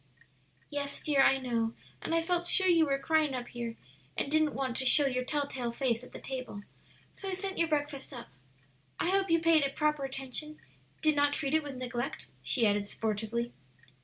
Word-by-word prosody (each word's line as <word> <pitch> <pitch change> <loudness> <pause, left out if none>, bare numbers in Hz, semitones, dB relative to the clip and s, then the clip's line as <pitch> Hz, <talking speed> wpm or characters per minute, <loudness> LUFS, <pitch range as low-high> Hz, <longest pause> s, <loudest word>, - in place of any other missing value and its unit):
"Yes, 285 -1 -2
dear, 285 -3 +2
I 270 - +6
know; 230 -3 -1 0.3
and 330 - -1
I 330 - +2
felt 350 0 0
sure 375 - +2
you 335 -4 +5
were 275 -1 +2
crying 310 -1 +2
up 245 -1 -5
here 235 -1 -5 0.4
and 280 - -1
didn't 310 -1 +2
want 260 -3 -1
to - - 0
show 290 +3 +7
your 255 -2 0
tell 290 +2 -1
tale 250 -4 -3
face 235 -1 0
at 250 - -12
the - - -8
table, 255 -6 -6 0.5
so 390 - -6
I - - -2
sent 385 +1 -3
your 335 - +4
breakfast 290 -2 -2
up. 245 -3 -8 0.7
I 355 - +1
hope 390 0 +2
you 330 - +5
paid 325 -2 +4
it 275 0 -1
proper 300 -2 +1
attention 270 +3 -5 0.5
did 310 -1 +4
not 290 0 +3
treat 285 -1 -1
it 315 - +4
with 285 -3 -7
neglect?" 245 0 -4 0.2
she 240 -4 +2
added 205 -1 +2
sportively. 220 +3 -2
275 Hz, 200 wpm, -31 LUFS, 245-310 Hz, 0.7 s, show